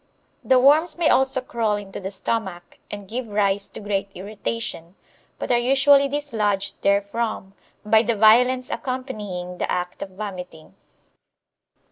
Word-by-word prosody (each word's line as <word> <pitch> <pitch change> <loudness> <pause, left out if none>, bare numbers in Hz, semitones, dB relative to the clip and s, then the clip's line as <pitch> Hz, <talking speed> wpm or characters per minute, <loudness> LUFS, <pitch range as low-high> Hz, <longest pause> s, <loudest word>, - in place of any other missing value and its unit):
The 260 - +4
worms 310 +6 +4
may 340 -2 +2
also 265 0 +2
crawl 230 -4 -1
into 200 -2 -7
the 190 -1 -5
stomach, 190 -2 -4
and 205 -1 -8
give 240 +3 -4
rise 205 -1 0
to - - -8
great 200 -1 -2
irritation, 200 -3 -5 0.4
but - - -4
are 240 - +4
usually 275 +3 +4
dislodged 220 -9 -2
therefrom 200 0 -1 0.3
by 220 +1 +5
the 235 0 0
violence 250 +5 +4
accompanying 210 -9 -5
the - - -2
act 180 0 -3
of - - -5
vomiting. 185 -5 -8
215 Hz, 135 wpm, -23 LUFS, 195-255 Hz, 0.4 s, by